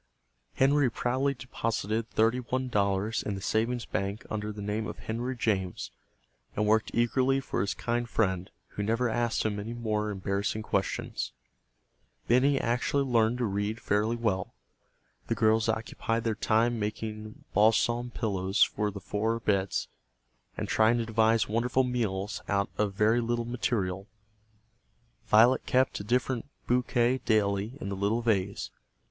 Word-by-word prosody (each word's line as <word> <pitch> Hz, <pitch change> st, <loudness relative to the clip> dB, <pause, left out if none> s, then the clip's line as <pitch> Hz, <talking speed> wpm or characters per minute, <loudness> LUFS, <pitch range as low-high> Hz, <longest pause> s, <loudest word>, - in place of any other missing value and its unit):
Henry 140 Hz, 0 st, +4 dB
proudly 130 Hz, +5 st, 0 dB
deposited 115 Hz, -3 st, -2 dB
thirty 115 Hz, +3 st, +2 dB
one 130 Hz, +1 st, -2 dB
dollars 100 Hz, 0 st, +1 dB
in 100 Hz, -, -3 dB
the -, -, -5 dB
savings 115 Hz, +4 st, 0 dB
bank 100 Hz, +3 st, -3 dB
under 105 Hz, 0 st, -2 dB
the 105 Hz, -, -9 dB
name 105 Hz, +2 st, -2 dB
of -, -, -6 dB
Henry 120 Hz, +4 st, -3 dB
James, 95 Hz, -6 st, -1 dB, 0.6 s
and 105 Hz, -, +1 dB
worked 110 Hz, +1 st, +3 dB
eagerly 130 Hz, +3 st, +2 dB
for 135 Hz, -, -2 dB
his 100 Hz, -, -1 dB
kind 120 Hz, 0 st, -2 dB
friend, 95 Hz, -6 st, 0 dB, 0.2 s
who -, -, -5 dB
never 115 Hz, +4 st, +1 dB
asked 120 Hz, 0 st, 0 dB
him 105 Hz, -1 st, -1 dB
any 115 Hz, +3 st, -5 dB
more 105 Hz, -2 st, -1 dB
embarrassing 100 Hz, +2 st, -2 dB
questions. 100 Hz, -2 st, -2 dB, 0.9 s
Benny 135 Hz, +3 st, +4 dB
actually 125 Hz, +4 st, +1 dB
learned 120 Hz, -2 st, +2 dB
to 125 Hz, -, 0 dB
read 105 Hz, +2 st, -2 dB
fairly 105 Hz, +2 st, +1 dB
well. 105 Hz, -6 st, -1 dB, 0.7 s
The -, -, 0 dB
girls 110 Hz, 0 st, +3 dB
occupied 115 Hz, +1 st, -1 dB
their 115 Hz, -, +1 dB
time 115 Hz, +2 st, +1 dB
making 110 Hz, 0 st, -5 dB
balsam 120 Hz, +3 st, +3 dB
pillows 100 Hz, -5 st, +1 dB
for 105 Hz, 0 st, 0 dB
the 100 Hz, 0 st, -7 dB
four 110 Hz, +4 st, -1 dB
beds, 100 Hz, -4 st, 0 dB, 0.7 s
and -, -, -3 dB
trying 110 Hz, +2 st, +3 dB
to 115 Hz, -, -1 dB
devise 110 Hz, -1 st, +3 dB
wonderful 120 Hz, +4 st, +1 dB
meals 105 Hz, -5 st, -2 dB
out 100 Hz, 0 st, 0 dB
of 105 Hz, -2 st, -1 dB
very 110 Hz, +4 st, +3 dB
little 120 Hz, 0 st, -1 dB
material. 100 Hz, -5 st, -2 dB, 1.2 s
Violet 115 Hz, +4 st, +5 dB
kept 130 Hz, +1 st, +2 dB
a -, -, -5 dB
different 125 Hz, +2 st, 0 dB, 0.2 s
bouquet 125 Hz, 0 st, +2 dB
daily 105 Hz, +2 st, 0 dB
in 100 Hz, -, -5 dB
the 100 Hz, -, -3 dB
little 105 Hz, +5 st, 0 dB
vase. 100 Hz, -4 st, 0 dB
110 Hz, 145 wpm, -29 LUFS, 105-120 Hz, 1.2 s, Violet